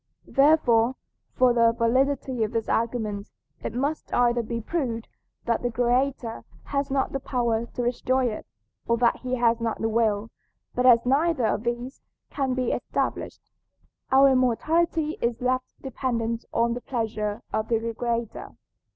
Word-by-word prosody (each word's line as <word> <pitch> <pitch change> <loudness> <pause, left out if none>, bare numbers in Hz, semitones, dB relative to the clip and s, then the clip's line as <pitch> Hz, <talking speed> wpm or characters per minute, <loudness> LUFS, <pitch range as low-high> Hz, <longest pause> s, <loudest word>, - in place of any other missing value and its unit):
Therefore, 265 -5 +4 0.4
for 250 -1 +4
the 230 -1 +4
validity 255 +1 +1
of 215 +2 -3
this 225 -1 -1
argument, 220 -3 -1 0.3
it 225 - -5
must 285 +5 -2
either 240 -1 +3
be 230 +1 -4
proved 235 -3 -3 0.4
that 235 - 0
the 245 - 0
"Creator" 245 0 0 0.2
has 280 0 -2
not 270 0 0
the 275 - -2
power 235 -3 -1
to 245 - -4
destroy 255 +1 +1
it, 220 -3 -3 0.4
or 235 - +2
that 235 0 +3
he 255 0 -3
has 235 -1 +2
not 230 -1 -2
the 225 - 0
will; 220 -1 +1 0.4
but 250 +1 +2
as 235 -1 +6
neither 280 0 +2
of 220 - 0
these 240 +3 -3 0.3
can 265 -3 -1
be 255 -2 0
established, - - -3 0.6
our 270 +1 +7
immortality 310 +6 +1
is 235 -1 0
left 255 +1 -2
dependent 235 -4 -2
on 235 0 +1
the 245 - -5
pleasure 220 -4 -3
of 215 0 -1
the 230 0 -1
Creator. 235 -1 -3
240 Hz, 150 wpm, -25 LUFS, 230-260 Hz, 0.6 s, our